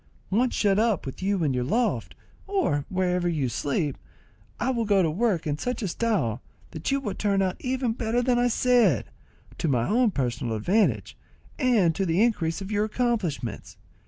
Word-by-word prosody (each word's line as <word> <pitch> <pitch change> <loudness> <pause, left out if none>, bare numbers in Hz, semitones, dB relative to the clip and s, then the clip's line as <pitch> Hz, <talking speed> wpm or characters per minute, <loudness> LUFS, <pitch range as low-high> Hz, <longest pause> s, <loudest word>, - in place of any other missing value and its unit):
Once 240 +5 +2
shut 200 -1 +2
up 220 -4 +1
with 135 - -7
you 195 -2 0
in 145 -4 +1
your 125 -1 0
loft, 230 - -1 0.3
or 340 - 0
wherever 180 -1 0
you 150 -6 0
sleep, 145 +4 -2 0.6
I 260 - +1
will 235 -3 0
go 200 -3 +3
to 160 - +1
work 195 -1 0
in 150 -1 -2
such 250 -1 -3
style 175 - -1 0.3
that 160 -1 -4
you 275 - +2
will 210 -8 -4
turn 200 -2 +1
out 185 -1 -1
even 255 -2 -1
better 235 +1 -1
than 245 -1 +2
I 245 - +3
said, 240 - +3 0.5
to - - 0
my 125 -5 +1
own 240 +2 +3
personal 120 - -2
advantage, 195 - +1 0.4
and 230 - +3
to 195 - -1
the 170 +6 +3
increase 180 -8 0
of 195 +2 -6
your 210 0 +1
accomplishments. 215 - -2
195 Hz, 180 wpm, -26 LUFS, 155-235 Hz, 0.6 s, go